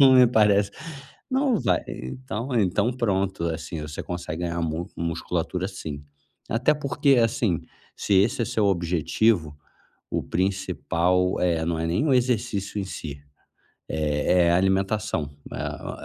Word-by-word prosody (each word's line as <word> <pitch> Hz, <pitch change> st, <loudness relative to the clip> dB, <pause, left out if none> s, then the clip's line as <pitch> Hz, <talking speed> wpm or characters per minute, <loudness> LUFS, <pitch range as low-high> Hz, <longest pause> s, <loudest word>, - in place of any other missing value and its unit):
não 135 Hz, -1 st, +8 dB
me 125 Hz, -1 st, +8 dB
parece, 105 Hz, -3 st, +3 dB, 0.6 s
não 260 Hz, -4 st, +2 dB
vai -, -, +2 dB
então 115 Hz, -, -5 dB
então 105 Hz, +4 st, +2 dB
pronto, 95 Hz, -7 st, -1 dB
assim, 80 Hz, -1 st, -3 dB
você 75 Hz, 0 st, -6 dB
consegue 85 Hz, -1 st, -5 dB
ganhar 85 Hz, 0 st, -2 dB
mus 80 Hz, +1 st, -3 dB
musculatura 85 Hz, +2 st, -2 dB
sim. 75 Hz, -7 st, -7 dB, 0.4 s
Até 125 Hz, +7 st, +3 dB
porque, 140 Hz, -1 st, +2 dB
assim, 110 Hz, -6 st, 0 dB, 0.4 s
se 100 Hz, -, 0 dB
esse 100 Hz, +5 st, +3 dB
é -, -, +1 dB
seu 105 Hz, -2 st, +1 dB
objetivo, 85 Hz, -1 st, +1 dB, 0.5 s
o -, -, -1 dB
principal, 90 Hz, -1 st, 0 dB
eh, 85 Hz, -3 st, +1 dB
não 85 Hz, -1 st, -1 dB
é 80 Hz, -, -1 dB
nem 90 Hz, -, +1 dB
o 135 Hz, -, +4 dB
exercício 115 Hz, -5 st, 0 dB
em -, -, -3 dB
si, 70 Hz, -6 st, -7 dB, 0.7 s
é 80 Hz, +3 st, +2 dB
é -, -, +4 dB
a 85 Hz, -, +4 dB
alimentação, 95 Hz, -4 st, 0 dB, 0.2 s
né. -, -, -6 dB
O -, -, -7 dB
95 Hz, 145 wpm, -25 LUFS, 85-110 Hz, 0.7 s, não